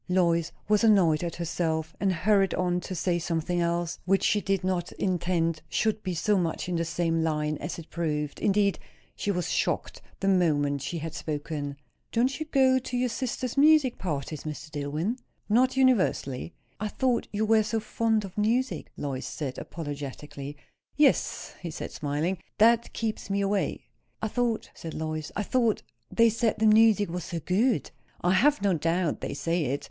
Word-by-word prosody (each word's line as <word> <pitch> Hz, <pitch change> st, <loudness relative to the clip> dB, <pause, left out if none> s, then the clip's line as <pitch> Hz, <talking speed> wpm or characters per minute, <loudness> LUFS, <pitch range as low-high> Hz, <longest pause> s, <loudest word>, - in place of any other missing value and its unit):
Lois 170 Hz, -3 st, +2 dB, 0.2 s
was 210 Hz, +1 st, +3 dB
annoyed 180 Hz, -8 st, +4 dB
at 170 Hz, -1 st, -3 dB
herself; 160 Hz, -1 st, -2 dB
and 195 Hz, -1 st, +2 dB
hurried 195 Hz, +2 st, +2 dB
on 180 Hz, -1 st, +1 dB
to 185 Hz, -, -5 dB
say 175 Hz, 0 st, 0 dB
something 170 Hz, +1 st, -1 dB
else, 170 Hz, 0 st, -1 dB
which 195 Hz, +1 st, +2 dB
she 210 Hz, -, +3 dB
did 195 Hz, -2 st, 0 dB
not 185 Hz, -2 st, -1 dB
intend 170 Hz, -3 st, 0 dB
should 220 Hz, +4 st, 0 dB
be 185 Hz, -2 st, -3 dB
so 200 Hz, +4 st, +2 dB
much 165 Hz, -1 st, -2 dB
in 180 Hz, -, -1 dB
the 165 Hz, -, +1 dB
same 165 Hz, 0 st, 0 dB
line 155 Hz, -1 st, 0 dB
as -, -, -5 dB
it 165 Hz, -1 st, -9 dB
proved. 150 Hz, -3 st, -2 dB
Indeed, 200 Hz, -1 st, +2 dB, 0.4 s
she -, -, -3 dB
was 180 Hz, -3 st, -1 dB
shocked -, -, -1 dB, 0.2 s
the 195 Hz, -, -1 dB
moment 145 Hz, -7 st, +2 dB
she 140 Hz, +5 st, -3 dB
had 160 Hz, 0 st, -5 dB
spoken. 145 Hz, -2 st, -4 dB, 0.3 s
"Don't 255 Hz, +4 st, +1 dB
you 315 Hz, -, -4 dB
go 265 Hz, -3 st, +4 dB
to 250 Hz, 0 st, -4 dB
your 250 Hz, 0 st, +1 dB
sister's 250 Hz, 0 st, -3 dB
music 290 Hz, -3 st, +5 dB
parties, 150 Hz, -3 st, -3 dB
Mr. 155 Hz, 0 st, -6 dB
Dillwyn?" 150 Hz, -, -2 dB, 0.3 s
"Not 255 Hz, +5 st, +3 dB
universally." 190 Hz, -, +2 dB, 0.3 s
"I 215 Hz, -, -1 dB
thought 250 Hz, +2 st, 0 dB
you 215 Hz, +1 st, 0 dB
were 220 Hz, 0 st, +5 dB
so 220 Hz, +1 st, -1 dB
fond 220 Hz, -1 st, 0 dB
of 190 Hz, -, -10 dB
music" 235 Hz, +5 st, 0 dB
Lois 135 Hz, -2 st, -3 dB
said 135 Hz, -4 st, -4 dB
apologetically. 145 Hz, -2 st, -7 dB, 0.4 s
"Yes," 295 Hz, -1 st, +2 dB
he 175 Hz, -, -4 dB
said, 155 Hz, -, -6 dB
smiling. 155 Hz, +5 st, -2 dB, 0.2 s
"That 230 Hz, +2 st, +4 dB
keeps 220 Hz, -3 st, -3 dB
me 200 Hz, 0 st, +1 dB
away." 200 Hz, 0 st, -1 dB, 0.3 s
"I 220 Hz, -, -2 dB
thought," 235 Hz, -1 st, -1 dB
said 165 Hz, -, -8 dB
Lois, 155 Hz, -1 st, -3 dB
"I 210 Hz, -, 0 dB
thought 230 Hz, 0 st, +1 dB, 0.3 s
they 230 Hz, 0 st, +4 dB
said 230 Hz, 0 st, 0 dB
the 220 Hz, -, +1 dB
music 215 Hz, -1 st, +6 dB
was 180 Hz, -1 st, -4 dB
so 170 Hz, -, -4 dB
good?" 210 Hz, -, +1 dB, 0.3 s
"I 175 Hz, -, +2 dB
have 265 Hz, +3 st, +3 dB
no 200 Hz, -2 st, +3 dB
doubt 165 Hz, +1 st, 0 dB
they -, -, -4 dB
say 165 Hz, +2 st, 0 dB
it. 140 Hz, +2 st, -1 dB
180 Hz, 175 wpm, -27 LUFS, 160-220 Hz, 0.4 s, music